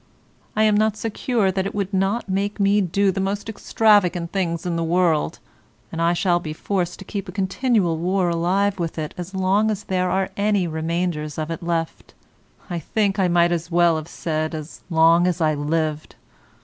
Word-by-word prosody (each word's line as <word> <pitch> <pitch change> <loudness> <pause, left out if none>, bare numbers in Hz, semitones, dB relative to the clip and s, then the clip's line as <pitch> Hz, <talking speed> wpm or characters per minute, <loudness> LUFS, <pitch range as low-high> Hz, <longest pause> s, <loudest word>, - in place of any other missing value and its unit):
I 215 - +3
am 215 -1 +4
not 215 0 +2
secure 225 -1 0
that 190 +1 -1
it - - -7
would 200 -1 -2
not 195 +5 0
make 200 +2 -2
me 200 +1 +3
do 195 +2 +1
the 190 - -4
most 200 +2 -2
extravagant 200 -6 +2
things 170 -4 -2
in 175 -1 -1
the 165 - -1
world, 165 -2 +1 0.5
and 165 - -3
I 170 +1 +3
shall 175 0 +2
be 155 -3 -6
forced 175 +1 -2
to 195 - -11
keep 200 -1 -5
a - - -5
continual 195 -2 0
war 180 +2 +1
alive 190 +4 +1
with 170 -1 -3
it 155 -1 -4
as 180 +2 -7
long 195 +3 +2
as 210 -1 -2
there 185 -2 0
are 190 +1 0
any 205 -2 +1
remainders 160 -1 -2
of 155 +1 -3
it 165 - -5
left; 170 -1 -3 0.5
I 175 -3 -3
think 200 +4 -1
I 190 - +3
might 175 0 +3
as 170 0 -2
well 170 -1 +4
have 155 0 -6
said 155 -1 -3
as 155 +1 -8
long 165 +1 +4
as 180 -1 -1
I 155 -2 +2
lived. 155 +1 -2
180 Hz, 195 wpm, -22 LUFS, 165-200 Hz, 0.5 s, am